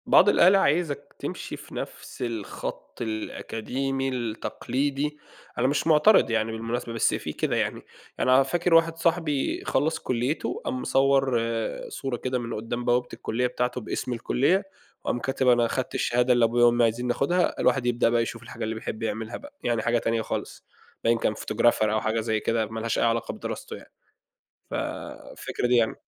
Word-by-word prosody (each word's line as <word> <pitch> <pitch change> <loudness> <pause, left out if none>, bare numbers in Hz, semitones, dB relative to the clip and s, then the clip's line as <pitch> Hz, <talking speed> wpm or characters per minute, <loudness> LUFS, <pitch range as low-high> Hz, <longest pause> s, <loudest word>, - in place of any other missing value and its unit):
بعض 205 - +6
الأهالي، 190 0 +6
عايزك 155 -3 0
تمشي - - -5
في - - -12
نفس - - -7
الخط 115 -1 -5
الأكاديمي، 125 +4 -3
التقليدي، 135 +4 -2 0.4
أنا 125 - +2
مش 145 +3 0
معترِض 160 - +6
يعني 110 0 +1
بالمناسبة، 115 +1 -3
بس 115 - +2
في - - -3
كده - - -1
يعني - - -1 0.4
يعني 130 - +3
أنا 130 +1 +7
فاكر 175 +5 0
واحد 165 0 +4
صاحبي 165 -4 0
خلّص 155 +4 +1
كُلّيته، 125 +5 -2
قام 130 - -2
مصور 135 -2 +3 0.5
صورة 135 -3 -4
كده 130 0 -2
من 120 -1 -5
قُدّام 115 +3 -4
بوابة 125 0 +2
الكُلّية 125 +3 -1
بتاعته 125 0 -2
باسم 125 +3 -3
الكُلّية، 140 - +2 0.4
وقام 120 - -1
كاتب 130 +1 -1
"أنا 120 -1 +5
خدت 130 +2 -3
الشهادة 125 +1 +2
اللي 120 -1 +4
أبويا 120 +1 +4
وأمي 120 0 +4
عايزينني 120 +2 +1
آخُدها، 175 +8 +1
الواحد 135 -3 +2
يبدأ 120 -1 +2
بقى 120 0 +2
يشوف 115 - -4
الحاجة - - -7
اللي 110 +1 -2
بيحب 110 0 -5
يعملها 110 +1 -3
بقى." 285 0 -13
يعني 120 -2 +1
حاجة 120 +2 +2
تانية 115 0 0
خالص، - - -5 0.4
باين 115 0 +3
كان 110 - 0
photographer 120 +2 +2
أو 110 0 +1
حاجة 110 +1 0
زي 110 -1 0
كده، 115 0 0
ما 110 +1 -6
لهاش 115 +1 -1
أي - - +2
علاقة 115 0 +1
بدراسته - - -6
يعني. - - -14 0.8
ف - - -5 0.6
الفكرة - - -3
دي 125 0 +4
يعني. 115 -2 +3
120 Hz, 175 wpm, -26 LUFS, 115-135 Hz, 0.8 s, أنا